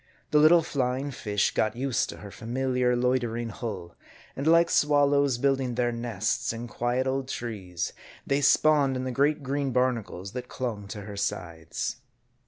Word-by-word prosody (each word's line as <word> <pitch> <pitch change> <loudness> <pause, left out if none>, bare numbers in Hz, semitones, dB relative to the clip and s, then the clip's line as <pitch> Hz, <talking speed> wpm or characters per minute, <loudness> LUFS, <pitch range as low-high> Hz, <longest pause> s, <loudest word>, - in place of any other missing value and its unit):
The 150 - +5
little 165 +2 +6
flying 135 -1 -1
fish 105 -5 0
got 110 - +1
used 130 0 0
to - - -7
her 100 - -10
familiar, 125 +2 0
loitering 120 -2 0
hull; 100 -7 -6 0.4
and 140 +3 -3
like 170 +1 +5
swallows 145 -3 +3
building 135 -1 +1
their 120 0 +1
nests 115 -3 -1
in 115 +1 -6
quiet 120 +2 -1
old 135 0 -1
trees, 100 -9 -4 0.3
they 140 +1 +1
spawned 145 -1 +4
in 130 - -2
the 130 - -2
great 145 +3 +1
green 140 0 -1
barnacles 115 -7 -1
that 125 +1 -6
clung 110 -6 -4
to 105 +1 -7
her 100 0 -8
sides. 85 -4 -3
125 Hz, 160 wpm, -27 LUFS, 115-140 Hz, 0.4 s, little